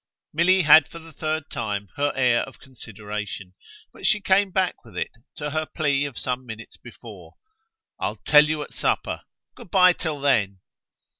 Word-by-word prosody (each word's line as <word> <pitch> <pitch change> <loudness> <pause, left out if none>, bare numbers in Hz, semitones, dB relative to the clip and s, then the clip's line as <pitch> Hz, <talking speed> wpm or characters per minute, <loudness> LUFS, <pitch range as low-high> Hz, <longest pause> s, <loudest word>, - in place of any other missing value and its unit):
Milly 180 +4 +4
had 155 -1 +7
for - - -11
the 165 -1 -13
third 155 +1 -3
time 105 -5 -3
her 145 0 +1
air 125 -3 +3
of 135 - -14
consideration; 105 -6 -8 0.4
but - - -3
she 215 - +3
came 195 0 +3
back 185 -1 -1
with 115 - -13
it - - -2 0.2
to 150 -1 -4
her 155 +1 -2
plea 145 -3 0
of 140 -5 -7
some 125 0 -3
minutes 115 -2 -9
before. - - -13 0.6
"I'll - - -2
tell 150 0 +5
you 155 -1 -2
at - - -13
supper - - -1 0.3
good - - -13
bye 185 -1 +6
till 155 -4 -4
then." 105 -9 +1
145 Hz, 170 wpm, -24 LUFS, 115-160 Hz, 0.6 s, had